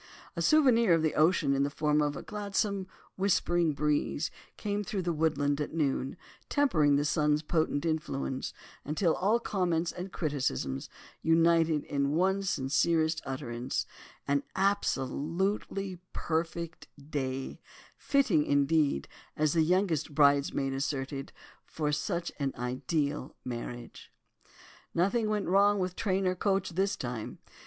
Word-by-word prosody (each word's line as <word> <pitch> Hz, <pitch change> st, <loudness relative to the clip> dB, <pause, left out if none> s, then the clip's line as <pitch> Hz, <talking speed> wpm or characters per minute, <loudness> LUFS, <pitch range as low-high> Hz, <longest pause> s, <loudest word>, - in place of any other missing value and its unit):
A -, -, -2 dB
souvenir 235 Hz, -, +5 dB
of 160 Hz, -, 0 dB
the 155 Hz, -, +1 dB
ocean 155 Hz, -2 st, +3 dB
in 135 Hz, -, +1 dB
the 140 Hz, -, +2 dB
form 150 Hz, +1 st, +1 dB
of 145 Hz, -1 st, 0 dB
a -, -, -7 dB
gladsome, 200 Hz, -1 st, -2 dB, 0.3 s
whispering 175 Hz, -4 st, +2 dB
breeze 150 Hz, +1 st, 0 dB, 0.3 s
came 205 Hz, -1 st, -2 dB
through 195 Hz, -1 st, -3 dB
the 170 Hz, -1 st, 0 dB
woodland 150 Hz, -2 st, +1 dB
at 150 Hz, -, -4 dB
noon, 135 Hz, -2 st, -1 dB, 0.3 s
tempering 160 Hz, -, +3 dB
the 145 Hz, +1 st, +1 dB
sun's 150 Hz, -1 st, +2 dB
potent 155 Hz, -1 st, 0 dB
influence, 155 Hz, -5 st, -2 dB, 0.3 s
until 160 Hz, +3 st, +1 dB
all 210 Hz, +5 st, +2 dB
comments 175 Hz, -6 st, 0 dB
and 180 Hz, +2 st, -7 dB
criticisms 130 Hz, -, -2 dB, 0.3 s
united 165 Hz, -1 st, +3 dB
in 140 Hz, 0 st, -1 dB
one 190 Hz, +3 st, +2 dB
sincerest 160 Hz, 0 st, +1 dB
utterance, 125 Hz, -3 st, -3 dB, 0.4 s
an 140 Hz, 0 st, +2 dB
absolutely 190 Hz, +1 st, -1 dB
perfect 170 Hz, +1 st, -3 dB, 0.2 s
day, 135 Hz, -2 st, -3 dB, 0.3 s
fitting, 255 Hz, -, +2 dB
indeed, 145 Hz, -, +2 dB, 0.3 s
as 155 Hz, -1 st, +2 dB
the 165 Hz, -, +3 dB
youngest 165 Hz, -3 st, +1 dB
bridesmaid 140 Hz, -2 st, +3 dB
asserted, 135 Hz, 0 st, -3 dB, 0.3 s
for 150 Hz, -2 st, -2 dB
such 170 Hz, +3 st, -2 dB
an 140 Hz, -2 st, -1 dB
ideal 135 Hz, +3 st, -2 dB
marriage. 120 Hz, -1 st, -7 dB, 0.8 s
Nothing 215 Hz, +6 st, +2 dB
went 210 Hz, -2 st, 0 dB
wrong 200 Hz, +2 st, +4 dB
with 185 Hz, -2 st, -2 dB
train 195 Hz, -2 st, 0 dB
or 185 Hz, -, +2 dB
coach 195 Hz, 0 st, 0 dB
this 195 Hz, +3 st, 0 dB
time. 120 Hz, -, -5 dB
160 Hz, 130 wpm, -30 LUFS, 140-185 Hz, 0.8 s, souvenir